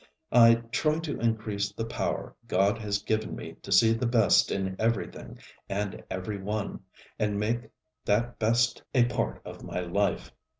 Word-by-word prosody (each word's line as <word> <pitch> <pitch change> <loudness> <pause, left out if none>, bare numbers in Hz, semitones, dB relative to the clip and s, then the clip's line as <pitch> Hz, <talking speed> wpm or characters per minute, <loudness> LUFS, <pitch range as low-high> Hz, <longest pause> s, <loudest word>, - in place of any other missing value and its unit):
I 115 -1 +8 0.2
try 155 +3 +1
to 160 -3 -4
increase 110 -3 -1
the 115 - -4
power 115 - -3
God 100 +5 +2
has 100 -2 -2
given 110 0 -1
me - - -7
to - - -9
see 115 0 +6
the 115 +2 -1
best 115 -3 +4
in 95 -1 -2
everything 115 +1 -2 0.3
and 100 0 -3
every 95 +2 -4
one, 105 +1 -3 0.4
and 105 -1 0
make 115 +2 -1 0.4
that 115 +4 0
Best 115 +1 +2
a 120 -2 +6
part 120 - -2
of - - -9
my 90 - -3
life. 100 +3 -1
110 Hz, 160 wpm, -28 LUFS, 100-115 Hz, 0.4 s, I